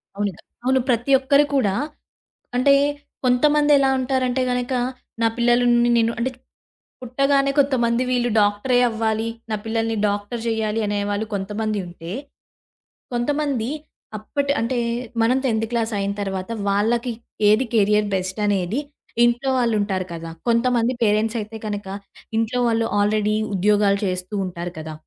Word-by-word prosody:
అవునుగా 200 Hz, -3 st, -3 dB, 0.2 s
అవును. 260 Hz, 0 st, +3 dB
ప్రతి 245 Hz, +3 st, +1 dB
ఒక్కరు 280 Hz, +2 st, +4 dB
కూడా 200 Hz, -7 st, +2 dB, 0.8 s
అంటే 280 Hz, +2 st, +5 dB, 0.5 s
కొంతమందెలా 290 Hz, +2 st, +4 dB
ఉంటారంటే 255 Hz, 0 st, 0 dB
గనక 250 Hz, +1 st, -1 dB, 0.5 s
నా 225 Hz, -, +4 dB
పిల్లల్ని 240 Hz, 0 st, +3 dB
నేను 230 Hz, 0 st, +2 dB
అంటే 255 Hz, +2 st, 0 dB, 0.7 s
పుట్టగానే 275 Hz, +2 st, +2 dB
కొంతమంది 250 Hz, -3 st, +2 dB
వీళ్ళు 245 Hz, -1 st, +1 dB
డాక్టరే 205 Hz, +5 st, +2 dB
అవ్వాలి. 220 Hz, 0 st, -1 dB, 0.2 s
నా -, -, +1 dB
పిల్లల్ని 225 Hz, 0 st, -1 dB
డాక్టరు 205 Hz, +3 st, -3 dB
జెయ్యాలి 220 Hz, -1 st, 0 dB
అనేవాళ్ళు 205 Hz, +1 st, -1 dB
కొంతమంది 210 Hz, +2 st, -2 dB
ఉంటే, 170 Hz, 0 st, -9 dB, 1.0 s
కొంతమంది 270 Hz, -1 st, -1 dB, 0.5 s
అప్పటి 280 Hz, +6 st, -2 dB
అంటే 240 Hz, +2 st, -1 dB, 0.4 s
మనం 245 Hz, +3 st, +3 dB
10థ్ 225 Hz, -2 st, +1 dB
క్లాస్ 230 Hz, -2 st, -1 dB
అయిన 200 Hz, 0 st, -1 dB
తరువాత 190 Hz, +1 st, -4 dB, 0.2 s
వాళ్ళకి 230 Hz, +5 st, +1 dB, 0.4 s
ఏది 225 Hz, +5 st, +4 dB
కేరియర్ 210 Hz, -1 st, +3 dB
బెస్ట్ 185 Hz, +2 st, -3 dB
అనేది 200 Hz, +3 st, 0 dB, 0.5 s
ఇంట్లో 240 Hz, +3 st, +1 dB
వాళ్ళు 235 Hz, -3 st, +2 dB
ఉంటారు 190 Hz, -3 st, -1 dB
కదా! 165 Hz, 0 st, -6 dB, 0.2 s
కొంతమంది 235 Hz, +1 st, +2 dB
పేరెంట్స్ 215 Hz, +2 st, +2 dB
అయితే 215 Hz, +1 st, -6 dB
కనక 205 Hz, -2 st, -4 dB, 0.5 s
ఇంట్లో 225 Hz, +2 st, 0 dB
వాళ్ళు 225 Hz, 0 st, +1 dB
ఆల్రెడీ 210 Hz, +1 st, +2 dB, 0.2 s
ఉద్యోగాలు 205 Hz, +1 st, +3 dB
చేస్తూ 185 Hz, +2 st, -3 dB
ఉంటారు 175 Hz, 0 st, -5 dB
కదా! 155 Hz, 0 st, -6 dB
225 Hz, 125 wpm, -22 LUFS, 205-250 Hz, 1.0 s, అంటే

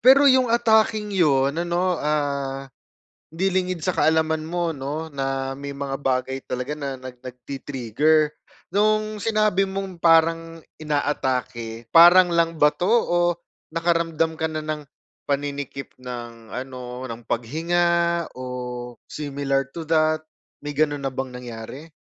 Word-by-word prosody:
Pero, 270 Hz, +3 st, +7 dB
'yong 260 Hz, -2 st, +5 dB
atakeng 220 Hz, -2 st, +3 dB
'yon, 140 Hz, -7 st, +3 dB
ano, 175 Hz, +1 st, 0 dB
ah, 140 Hz, -2 st, -1 dB, 0.6 s
'di 185 Hz, +4 st, -1 dB
lingid 185 Hz, -3 st, -1 dB
sa 185 Hz, -, +1 dB
kaalaman 160 Hz, 0 st, +2 dB
mo, 175 Hz, -1 st, -1 dB
'no, 150 Hz, +3 st, -5 dB
na 135 Hz, -1 st, -2 dB
may 140 Hz, +1 st, -7 dB
mga 140 Hz, -1 st, -3 dB
bagay 130 Hz, 0 st, -1 dB
talaga 125 Hz, +3 st, -3 dB
na 140 Hz, -3 st, -4 dB
nag 130 Hz, -1 st, -10 dB
nagti-trigger. 135 Hz, +4 st, 0 dB, 0.4 s
No'ng 215 Hz, +1 st, +1 dB
sinabi 215 Hz, -3 st, +2 dB
mong 190 Hz, -2 st, -5 dB
parang 165 Hz, 0 st, +3 dB, 0.2 s
inaatake, 125 Hz, -6 st, -2 dB
parang 175 Hz, +1 st, +8 dB
lang 165 Hz, -1 st, +2 dB
ba 150 Hz, 0 st, +5 dB
'to? 180 Hz, +2 st, -2 dB
O, 225 Hz, -6 st, +3 dB, 0.5 s
nakaramdam 165 Hz, -1 st, 0 dB
ka 160 Hz, -, +2 dB
na 155 Hz, -1 st, -4 dB
ng, 155 Hz, -1 st, -3 dB, 0.4 s
paninikip 140 Hz, -1 st, -3 dB
ng 120 Hz, -2 st, -8 dB
ano, 125 Hz, -1 st, -6 dB
ng 120 Hz, -2 st, -6 dB
paghinga, 170 Hz, +6 st, +1 dB
o 125 Hz, -1 st, -6 dB, 0.2 s
similar 140 Hz, -2 st, -1 dB
to 165 Hz, -, -5 dB
that, 155 Hz, 0 st, +2 dB, 0.4 s
may 145 Hz, -, -4 dB
gano'n 145 Hz, -1 st, 0 dB
na 135 Hz, -, -1 dB
bang 130 Hz, 0 st, -5 dB
nangyari? 125 Hz, +5 st, -8 dB
150 Hz, 130 wpm, -23 LUFS, 135-170 Hz, 0.6 s, parang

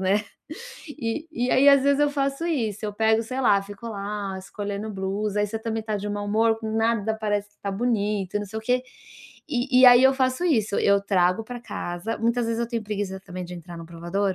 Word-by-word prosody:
né, 200 Hz, +3 st, +1 dB, 0.6 s
e 280 Hz, +2 st, -4 dB
e 245 Hz, -2 st, -1 dB
aí, 280 Hz, +2 st, +5 dB
às 280 Hz, -1 st, +7 dB
vezes, 280 Hz, +1 st, +3 dB
eu 290 Hz, 0 st, +3 dB
faço 275 Hz, +2 st, -1 dB
isso, 225 Hz, -, -2 dB
eu 205 Hz, -, -4 dB
pego, 220 Hz, +1 st, +2 dB
sei 255 Hz, +4 st, -4 dB
lá, 205 Hz, -6 st, +4 dB
fico 205 Hz, +3 st, -10 dB
lá 200 Hz, -2 st, -4 dB
escolhendo 205 Hz, +2 st, -5 dB
blusa, 200 Hz, +2 st, -2 dB
aí 205 Hz, -, +2 dB
você 220 Hz, +2 st, -4 dB
também 225 Hz, 0 st, -3 dB
tá 215 Hz, -1 st, -2 dB
de 205 Hz, +1 st, -4 dB
mau 205 Hz, 0 st, -3 dB
humor, 225 Hz, +2 st, +2 dB
nada 220 Hz, 0 st, 0 dB
parece 205 Hz, -1 st, -1 dB
que 205 Hz, -, -34 dB
está 200 Hz, -, -4 dB
bonito, 205 Hz, -3 st, 0 dB
não 205 Hz, -, -5 dB
sei 220 Hz, +3 st, -5 dB
o 220 Hz, -, -9 dB
quê, 250 Hz, +2 st, +1 dB, 0.7 s
e 255 Hz, -1 st, +2 dB
e -, -, +6 dB
e 255 Hz, -, +10 dB
aí 245 Hz, +1 st, +7 dB
eu 265 Hz, 0 st, +6 dB
faço 260 Hz, +4 st, 0 dB
isso, 220 Hz, -, +1 dB
eu 200 Hz, -, +6 dB, 0.2 s
trago 180 Hz, +3 st, +3 dB
pra 245 Hz, +1 st, -7 dB
casa 175 Hz, -2 st, -5 dB
muitas 235 Hz, 0 st, +1 dB
vezes 230 Hz, 0 st, -1 dB
eu 235 Hz, -, -1 dB
tenho 230 Hz, -2 st, -2 dB
preguiça 200 Hz, -2 st, -3 dB
também 185 Hz, -1 st, -7 dB
de 180 Hz, +1 st, -8 dB
entrar 170 Hz, 0 st, -10 dB
no 165 Hz, -, -9 dB
provador, 185 Hz, +4 st, -1 dB
215 Hz, 225 wpm, -25 LUFS, 200-240 Hz, 0.7 s, e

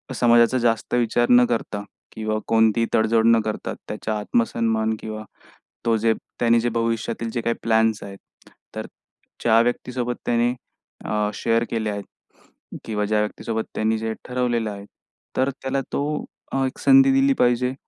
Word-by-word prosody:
समाजाचा 120 Hz, +1 st, +4 dB
जास्त 115 Hz, -2 st, 0 dB
विचार 120 Hz, 0 st, +1 dB
न 125 Hz, 0 st, +7 dB
करता 110 Hz, -3 st, -2 dB, 0.3 s
किंवा 110 Hz, 0 st, -2 dB
कोणतीही 115 Hz, 0 st, +3 dB
तडजोड 110 Hz, 0 st, +3 dB
न 115 Hz, 0 st, +6 dB
करता 110 Hz, -, -3 dB, 0.2 s
त्याच्या 110 Hz, -1 st, -3 dB
आत्मसन्मान 110 Hz, 0 st, 0 dB
किंवा 110 Hz, 0 st, -6 dB, 0.6 s
तो 115 Hz, -1 st, +3 dB
जे 115 Hz, +1 st, +2 dB, 0.3 s
त्यांनी 115 Hz, -1 st, +4 dB
जे 120 Hz, -, 0 dB
भविष्यातील 115 Hz, 0 st, -2 dB
जे 120 Hz, -, -1 dB
काही 115 Hz, 0 st, 0 dB
प्लॅन्स 110 Hz, -1 st, +2 dB
आहेत, 100 Hz, -1 st, -9 dB, 0.6 s
तर -, -, -4 dB, 0.6 s
ज्या 115 Hz, -1 st, +5 dB
व्यक्तीसोबत 120 Hz, 0 st, -2 dB
त्याने 120 Hz, +1 st, +2 dB, 0.5 s
अ, 105 Hz, -1 st, 0 dB
शेअर 115 Hz, 0 st, +1 dB
केले 110 Hz, -2 st, -1 dB
आहेत 100 Hz, 0 st, -5 dB, 0.8 s
किंवा 105 Hz, -2 st, -2 dB
ज्या 105 Hz, +1 st, +1 dB
व्यक्तीसोबत 110 Hz, +1 st, -2 dB
त्यांनी 110 Hz, +1 st, +1 dB
जे 110 Hz, 0 st, -2 dB
ठरवलेलं 120 Hz, -3 st, -1 dB
आहे. 100 Hz, 0 st, -9 dB, 0.5 s
तर 130 Hz, +1 st, +2 dB
त्याला 135 Hz, +1 st, -1 dB
तो 140 Hz, -, 0 dB, 0.5 s
अ, 135 Hz, 0 st, +1 dB
एक 130 Hz, -, -4 dB
संधी 270 Hz, 0 st, +6 dB
दिली 270 Hz, 0 st, +4 dB
पाहिजे 125 Hz, +1 st, +2 dB
115 Hz, 150 wpm, -23 LUFS, 110-120 Hz, 0.8 s, न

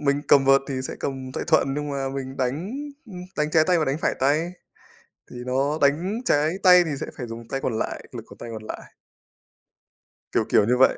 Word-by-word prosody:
mình 140 Hz, -1 st, +1 dB
cầm 140 Hz, -1 st, +6 dB
vợt 135 Hz, 0 st, +6 dB
thì 135 Hz, -, -2 dB
sẽ -, -, -5 dB
cầm 130 Hz, -1 st, -4 dB
tay -, -, -3 dB
thuận, 150 Hz, -4 st, +3 dB
nhưng 150 Hz, 0 st, -3 dB
mà 135 Hz, -1 st, -2 dB
mình 135 Hz, 0 st, -5 dB
đánh, 140 Hz, -, -2 dB, 0.4 s
ưm, 180 Hz, -4 st, -9 dB, 0.2 s
đánh 150 Hz, 0 st, 0 dB
trái 155 Hz, 0 st, +4 dB
tay 180 Hz, -2 st, +3 dB
và 155 Hz, -, +2 dB
đánh 135 Hz, +3 st, -1 dB
phải -, -, +1 dB
tay. 155 Hz, +6 st, +2 dB, 0.8 s
Thì -, -, -10 dB
nó 140 Hz, +4 st, 0 dB
đánh 170 Hz, +11 st, +1 dB
trái 150 Hz, -4 st, +3 dB
tay 180 Hz, -2 st, +7 dB
thì 160 Hz, -, -3 dB
sẽ -, -, -3 dB
phải 125 Hz, -, -5 dB
dùng 115 Hz, 0 st, -9 dB
tay 135 Hz, -, -2 dB
còn 115 Hz, -5 st, -2 dB
lại, -, -, -3 dB
lực -, -, -6 dB
của -, -, -14 dB
tay 120 Hz, -, -8 dB
còn 110 Hz, -1 st, -7 dB
lại. -, -, -8 dB, 1.4 s
Kiểu, -, -, +1 dB
kiểu 105 Hz, -, +4 dB
như 125 Hz, +2 st, +2 dB
vậy. 130 Hz, -, +5 dB
140 Hz, 225 wpm, -24 LUFS, 130-155 Hz, 1.4 s, tay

